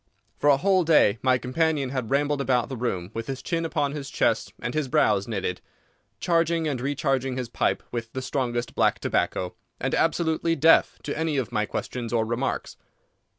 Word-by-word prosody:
For 145 - +3
a 140 - +6
whole 185 +3 +3
day 150 -10 +4
my 130 -1 +3
companion 140 +1 0
had 130 -4 -3
rambled 145 +1 +1
about 125 -3 +1
the 135 - -4
room 100 -7 -3
with 115 0 -5
his 135 -1 -5
chin 165 -1 -1
upon 145 -3 0
his 140 -2 -6
chest - - 0
and 120 - -4
his 155 -3 -1
brows 105 -5 +2
knitted, 95 -5 -3 0.6
charging 165 -1 +1
and 135 -5 -2
recharging 135 -2 -1
his 125 -3 -3
pipe - - 0
with 115 -1 -4
the 130 - -3
strongest 120 -3 -2
black - - +2
tobacco, 90 -1 -1 0.3
and - - -2
absolutely 165 0 +1
deaf 165 +2 +4
to - - -3
any 160 -2 -1
of 130 -4 -2
my 105 -1 0
questions 120 -3 -4
or 115 -2 +1
remarks. 120 +4 -3
135 Hz, 185 wpm, -25 LUFS, 120-155 Hz, 0.6 s, a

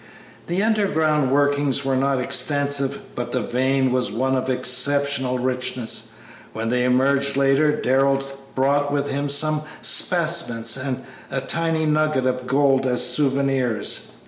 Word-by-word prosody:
The 180 +4 0
underground 160 - +1
workings 140 0 +1
were 135 -1 0
not 135 0 +1
extensive, 140 +2 0
but 120 0 -5
the 125 - 0
vein 130 +3 0
was 125 -4 0
one 130 +5 0
of 130 0 -2
exceptional 130 +1 +1
richness. 125 -2 -2 0.4
When 115 +1 -3
they 125 +1 +1
emerged 140 +2 +1
later 140 +2 +2
Darrell 135 +1 +1 0.3
brought 145 +2 +1
with 145 0 -1
him 140 +1 -2
some 150 +2 +1 0.2
specimens 160 -10 +2
and 130 -1 -3 0.2
a 135 - -2
tiny 165 +2 -1
nugget 155 -3 +1
of 125 0 -2
gold 135 0 +2
as 125 -1 0
souvenirs. 135 -3 0
135 Hz, 135 wpm, -21 LUFS, 125-145 Hz, 0.4 s, later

